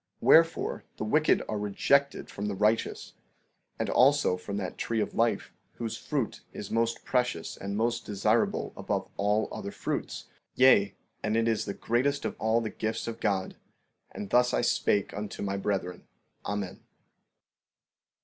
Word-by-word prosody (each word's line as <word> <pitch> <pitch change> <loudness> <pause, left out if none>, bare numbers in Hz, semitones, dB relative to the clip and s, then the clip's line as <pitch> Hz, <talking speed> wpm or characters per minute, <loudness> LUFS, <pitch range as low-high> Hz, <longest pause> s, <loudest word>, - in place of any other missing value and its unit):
15:36 - - -44
Wherefore, 165 0 +4
the - - -3
wicked 150 +8 +3
are 105 - -2
rejected 140 +7 +1
from 100 +1 -4
the 100 - -2
righteous, 105 +3 0 0.6
and - - -1
also 135 -5 +4
from 100 +2 -5
that 95 -2 -4
tree 115 -1 -1
of - - -1
life, 115 0 0 0.2
whose 115 -1 -4
fruit 135 -1 -3
is 100 - -7
most 115 +1 0
precious 125 -10 -1
and 100 +1 -4
most 115 +1 0
desirable 100 -2 0
above - - -2
all 105 +2 +1
other - - -5
fruits; - - -4 0.3
yea, 100 -7 +5 0.3
and 110 +1 0
it 115 0 +2
is 115 -2 +1
the 100 - -4
greatest 140 +4 0
of - - -2
all 110 +1 +2
the 110 - -3
gifts 110 +1 -3
of 115 - -5
God. 100 -3 -1 0.5
And 100 - -7
thus 125 0 +4
I - - +2
spake 100 -1 +1
unto 105 0 -5
my 100 -1 -1
brethren. 95 -3 -3 0.4
Amen. 100 -2 -3
110 Hz, 160 wpm, -29 LUFS, 100-120 Hz, 0.6 s, yea